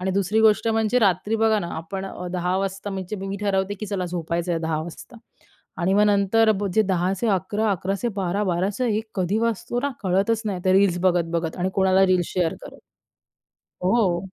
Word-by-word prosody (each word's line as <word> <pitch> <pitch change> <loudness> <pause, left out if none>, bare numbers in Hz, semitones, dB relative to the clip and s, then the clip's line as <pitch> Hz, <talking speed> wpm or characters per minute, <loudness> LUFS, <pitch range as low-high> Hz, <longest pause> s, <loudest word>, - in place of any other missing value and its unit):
आणि 190 +1 -1
दुसरी 200 +3 +1
गोष्ट 220 0 +4
म्हणजे 225 +2 +2
रात्री 205 0 +1
बघा 220 -1 +3
ना 175 -4 -4
आपण 180 +4 -5
अ, 180 -1 -7
10 180 +1 0
वाजता 195 +1 -3
म्हणजे 190 +1 -5
मी 195 0 -5
ठरवते, 200 -1 0
की 215 +2 -7
चला 195 -2 -2
झोपायचं 170 0 -2
आहे 165 - 0
10 160 -1 -1
वाजता 175 +8 -10 0.7
आणि 190 +3 +2
मग 205 - +4
नंतर 205 +2 +3 0.2
जे 220 - +5
10चे 190 +3 0
11, 205 +2 0
11चे 195 +4 -1
12, 190 +2 -1
12चं 190 +5 -1
1 220 0 -1
कधी 190 +2 0
वाजतो 230 +1 -1
ना, 285 - -1
कळतच 200 +4 +1
नाही 195 -4 -2
ते 185 - +3
रील्स 190 -2 +3
बघत-बघत 170 -2 0
आणि 185 +1 -1
कोणाला 190 0 +4
रील्स 180 -2 +2
शेअर 175 -3 +1
करत. - - -11 1.1
हो. 185 -3 +2
195 Hz, 185 wpm, -23 LUFS, 180-210 Hz, 1.1 s, जे